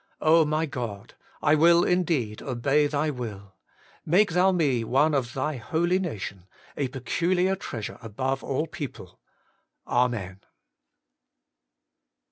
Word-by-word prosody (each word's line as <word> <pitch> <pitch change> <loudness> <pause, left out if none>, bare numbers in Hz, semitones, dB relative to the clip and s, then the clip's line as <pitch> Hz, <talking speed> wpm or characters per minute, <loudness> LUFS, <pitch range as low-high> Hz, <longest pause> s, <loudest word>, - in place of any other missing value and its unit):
my 155 +1 0
God! 115 -8 -6 0.3
I 150 - +4
will 170 +3 +5
indeed 160 -12 0
obey 135 +3 +1
Thy 150 +1 0
will: 105 -7 -7 0.5
make 185 +5 +3
Thou 180 +3 +4
me 145 -10 +1
one 140 +7 +2
of 125 -4 -1
Thy 140 +2 -2
holy 170 - 0
nation, 100 - -5 0.3
a 140 - -1
peculiar 175 +8 0
treasure 115 - -6
above 130 +5 -3
all 140 +3 -1
people. 155 -6 -8 0.7
Amen. 115 -7 0
140 Hz, 110 wpm, -26 LUFS, 120-165 Hz, 0.7 s, will